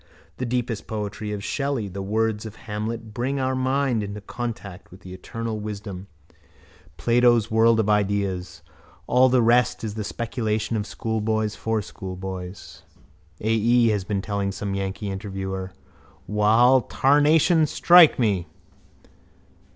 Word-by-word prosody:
The 130 - -3
deepest 120 -2 -2
poetry 105 0 -4
of 105 -1 -5
Shelley, 140 -6 -2
the 100 +1 -6
words 110 +2 -1
of 110 - -10
Hamlet 110 +1 -5
bring 130 +4 -2
our 130 0 0
minds 130 -3 0
into 100 +1 -6
contact 105 -3 -7
with 90 +2 -15
the 90 -1 -10
eternal 110 +4 -5
wisdom, 100 -2 -7 0.9
Plato's 120 -2 +3
world 110 +1 +4
of 110 - +1
ideas. 100 -4 -1 0.4
All 130 +4 +4
the 125 -1 +3
rest 120 0 +3
is 110 -2 -3
the 110 0 -4
speculation 110 -1 -2
of 105 -1 -2
schoolboys 110 0 -2
for 110 -2 -2
schoolboys. 95 -4 -8 0.6
A. 110 - 0
E. 115 +2 +3
has 105 -3 0
been 95 0 -2
telling 100 -1 -2
some 100 +1 -4
yankee 100 +1 -3
interviewer. 95 -1 -5 0.5
Wall, 115 +5 +4
tarnation 150 +5 +3
strike 175 +1 +6
me! 100 -8 0
110 Hz, 135 wpm, -24 LUFS, 100-120 Hz, 0.9 s, strike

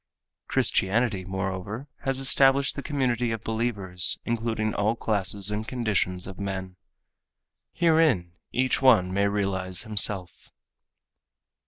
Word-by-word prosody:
Christianity, 100 -1 +1
moreover, 95 +6 -4 0.2
has 135 -1 0
established 135 0 +4
the - - -4
community 125 -5 -1
of 115 -2 -4
believers 105 -6 -1
including 115 -2 -1
all 105 +3 0
classes 100 -2 0
and 105 +1 -3
conditions 105 -7 -1
of 95 0 -9
men. 95 -2 -5 1.0
Herein 155 - +2 0.2
each 130 +1 0
one 105 -9 +4
may 100 +1 +2
realize 95 -2 -2
himself. 105 -4 0
105 Hz, 110 wpm, -26 LUFS, 95-120 Hz, 1.0 s, established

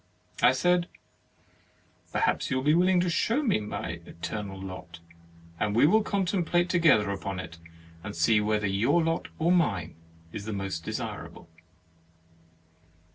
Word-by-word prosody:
I - - +7
said: 175 +6 +2 0.6
" - - -35
Perhaps - - 0
you 130 - 0
will 130 - -2
be 150 +2 +4
willing 180 +2 +4
to 180 - 0
show 235 - +1
me 215 - +2
my 100 -5 -5
eternal 95 +4 -6
lot, 90 -3 -8 0.6
and 105 -1 0
we 120 - +5
will 215 +8 +5
contemplate 180 -3 0
together 155 - +4
upon 95 -1 -4
it, 85 -2 -8 0.4
and 105 -2 -6
see 105 +6 +3
whether 105 0 0
your 115 - +2
lot 165 +1 -1
or 165 +2 +2
mine 100 - +1 0.4
is 105 +1 -6
most 95 -5 -4
desirable.' - - -6
110 Hz, 140 wpm, -27 LUFS, -, 0.6 s, I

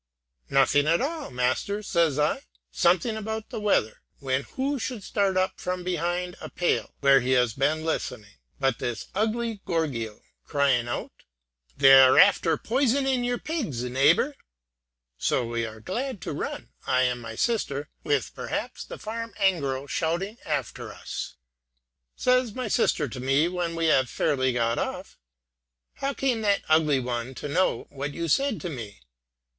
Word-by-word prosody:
'Nothing 135 +2 +4
at 165 +2 +4
all, 305 +2 -3
master,' 130 +12 -1
says 165 -7 +1
I; 150 0 +1 0.3
'something 180 - +2
about 220 0 -5
the - - -4
weather,' 155 - +1 0.2
when 130 0 -1
who 275 +1 -1
should 235 -3 -4
start 195 -2 0
up 185 0 0
from 180 0 -3
behind 180 0 -2
a - - -6
pale, 175 - -1
where 140 -1 +6
he 130 +1 0
has 125 -3 +3
been 150 +5 0
listening, 105 -10 -3 0.2
but 135 -3 +1
this 120 -2 -4
ugly 220 +1 -1
gorgio, 125 -11 -2 0.2
crying 135 -4 +1
out, 120 - -4 0.7
'They 135 0 +7
are 130 -1 +8
after 180 -5 +5
poisoning 265 +1 +1
your 245 0 0
pigs, 235 - -3
neighbor,' 140 - +3 0.9
so - - +1
that 120 - -4
we 115 -1 -1
are 110 0 -10
glad 240 - -4
to - - -4
run, - - -5 0.2
I 130 - +3
and 125 -1 0
my 115 -1 -7
sister, 150 - -1 0.2
with 435 - 0
perhaps - - -4
the - - -9
farm 230 +1 -6
engro 140 -9 +1
shouting 175 +9 -2
after 140 -8 -3
us. - - -6 0.8
Says 250 -3 +2
my 255 -2 -3
sister 150 -6 +2
to 125 - -7
me, 135 +5 +2
when 175 -2 -2
we 165 0 0
have 135 -5 +4
got - - -15
fairly 130 -3 +1
off, 115 0 -2 0.8
'How 275 0 -2
came 250 -4 0
that 200 -2 +2
ugly 155 -3 +4
one 125 0 -3
to - - -5
know 180 +6 +1
what 140 +1 -5
you 170 0 -2
said 270 - +1
to 180 - -4
me?' 110 - -8
160 Hz, 160 wpm, -26 LUFS, 130-215 Hz, 0.9 s, are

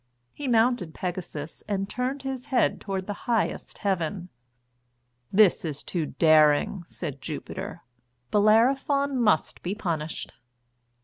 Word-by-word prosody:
He 290 - -5
mounted 230 -7 +2
Pegasus 170 -4 -5
and 195 -1 -1
turned 255 +5 -3
his 265 -1 -4
head 260 -4 +2
toward 190 -2 -3
the 205 - -3 0.2
highest 230 -2 0
heaven. 185 -2 -2 1.0
"This 205 -2 +5
is 150 -4 -4
too 170 -4 -2
great - - -13
daring," 155 +3 +4
said 145 -6 -6
Jupiter; 185 +5 -6 0.5
"Bellerophon 260 +6 +3
must 160 -9 +2
be 185 +3 -3
punished." 165 -7 -3
195 Hz, 120 wpm, -26 LUFS, 165-240 Hz, 1.0 s, This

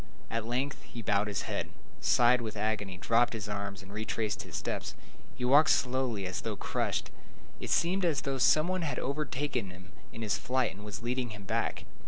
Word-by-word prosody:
At 115 -1 -1
length 130 +4 -1
he 115 - -8
bowed 105 0 +2
his 100 -2 -2
head, - - -2 0.3
sighed 120 +1 +5
with 110 -2 -4
agony, 105 -3 -1
dropped 120 +6 +3
his 110 -2 -4
arms, 100 -2 -4
and 95 +1 -11
retraced 110 -1 -1
his - - -8
steps. - - -3 0.4
He 125 - -2
walked 145 +5 +7
slowly, 125 -5 +2
and 90 - -3
as 90 - -3
though - - -3
crushed. - - -1 0.5
It - - -5
seemed 185 +3 +3
as 160 -6 +2
though 135 -1 -2
some 155 +7 +5
one 185 0 0
had 155 -3 -1
overtaken 140 -5 -1
him 90 +2 -12 0.2
in 115 - -6
his 105 -2 +1
flight 130 0 +1
and 100 +2 -11
was 105 +1 -6
leading 125 0 -1
him 105 -2 -8
back. 95 - -1
115 Hz, 200 wpm, -31 LUFS, 105-130 Hz, 0.5 s, walked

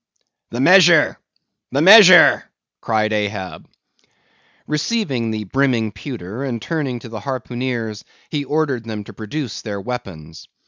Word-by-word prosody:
"The 120 - -6
measure! 170 0 +5 0.5
the 140 +3 0
measure!" 185 -2 +7 0.3
cried 110 -1 -1
Ahab. 100 -5 -4 1.0
Receiving 150 - -2
the 110 -1 -4
brimming 120 -1 0
pewter, 110 0 -8
and 125 -4 -4
turning 140 -2 -3
to 115 - -11
the 110 -1 -7
harpooneers, 120 -3 -5 0.3
he 145 -2 -2
ordered 140 -5 -2
them 110 -2 -6
to - - -13
produce 115 +2 -6
their 105 -3 -6
weapons. 90 -9 -8
120 Hz, 125 wpm, -19 LUFS, 110-145 Hz, 1.0 s, measure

